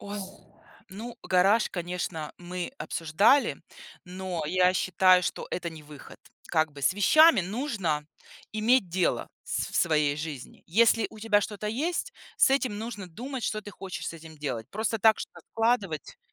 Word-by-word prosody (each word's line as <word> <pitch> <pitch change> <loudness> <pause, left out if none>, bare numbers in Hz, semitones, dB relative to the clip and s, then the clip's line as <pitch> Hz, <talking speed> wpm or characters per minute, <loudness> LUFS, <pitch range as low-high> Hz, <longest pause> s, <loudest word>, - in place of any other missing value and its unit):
Ой. 205 +1 -6 0.7
Ну, 225 +5 -8
гараж, 195 +5 +3
конечно, 175 -3 -4
мы 180 +5 -5
обсуждали. 195 - +2 0.5
Но 180 -2 -5
я 180 +2 +3
считаю, 185 0 +4
что - - -3
это 175 -1 -3
не 160 -1 -11
выход. 150 -2 -13 0.3
Как 155 -2 +1
бы 140 - -11
с 140 +7 +2
вещами 310 +8 +6
нужно 190 - -2 0.5
иметь 220 0 +3
дело 180 +1 0 0.2
в - - -19
с - - -1
в - - -12
своей 150 -3 +2
жизни. 150 -4 -7
Если 225 +3 +4
у 220 - -13
тебя 210 -1 +3
что-то 210 0 -5
есть, 330 - -2 0.2
с - - +5
этим 260 -6 +1
нужно 220 -3 -6
думать, 245 +9 -6
что 215 -1 -1
ты 205 - -9
хочешь 195 -2 -7
с - - -5
этим 160 -1 -12
делать. 130 -7 -4
Просто 220 +1 -1
так 220 +1 +5
что-то - - -8
складывать? 225 - 0
190 Hz, 160 wpm, -27 LUFS, 165-225 Hz, 0.7 s, вещами